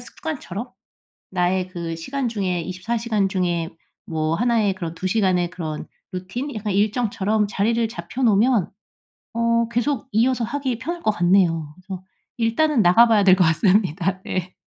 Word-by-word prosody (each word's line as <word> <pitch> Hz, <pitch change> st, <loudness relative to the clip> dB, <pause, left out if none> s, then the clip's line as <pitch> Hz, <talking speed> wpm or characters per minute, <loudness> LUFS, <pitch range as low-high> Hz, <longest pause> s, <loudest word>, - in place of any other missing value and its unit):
습관처럼. 250 Hz, -, -6 dB, 0.6 s
나의 185 Hz, 0 st, 0 dB
그 170 Hz, -3 st, -5 dB
시간 260 Hz, +10 st, -3 dB
중에 185 Hz, -6 st, -1 dB
24 185 Hz, +7 st, -3 dB
시간 215 Hz, -4 st, 0 dB
중에 175 Hz, -3 st, -1 dB, 0.4 s
뭐 160 Hz, 0 st, -1 dB
1 235 Hz, +3 st, +2 dB
의 195 Hz, -2 st, +1 dB
그런 170 Hz, -3 st, -5 dB
2 180 Hz, +3 st, -4 dB
시간의 185 Hz, -4 st, +1 dB
그런 160 Hz, -4 st, -5 dB, 0.3 s
루틴, 215 Hz, +10 st, -5 dB
약간 210 Hz, -2 st, -3 dB
일정처럼 210 Hz, 0 st, +1 dB
자리를 225 Hz, +3 st, +1 dB
잡혀 215 Hz, +6 st, -6 dB
놓으면 220 Hz, -2 st, +3 dB, 0.7 s
어 230 Hz, 0 st, +2 dB
계속 240 Hz, +1 st, -1 dB
이어서 240 Hz, +2 st, +2 dB
하기 260 Hz, 0 st, -2 dB
편할 335 Hz, +7 st, -5 dB
것 215 Hz, -, +3 dB
같네요. 175 Hz, -5 st, +2 dB
그래서 185 Hz, 0 st, -8 dB, 0.4 s
일단은 240 Hz, +5 st, +2 dB
나가 185 Hz, +6 st, +6 dB
봐야 215 Hz, -3 st, +4 dB
될 185 Hz, -1 st, +7 dB
것 180 Hz, -, +4 dB
같습니다. 185 Hz, +1 st, +2 dB
네. 185 Hz, 0 st, -4 dB
200 Hz, 290 characters per minute, -22 LUFS, 180-235 Hz, 0.7 s, 될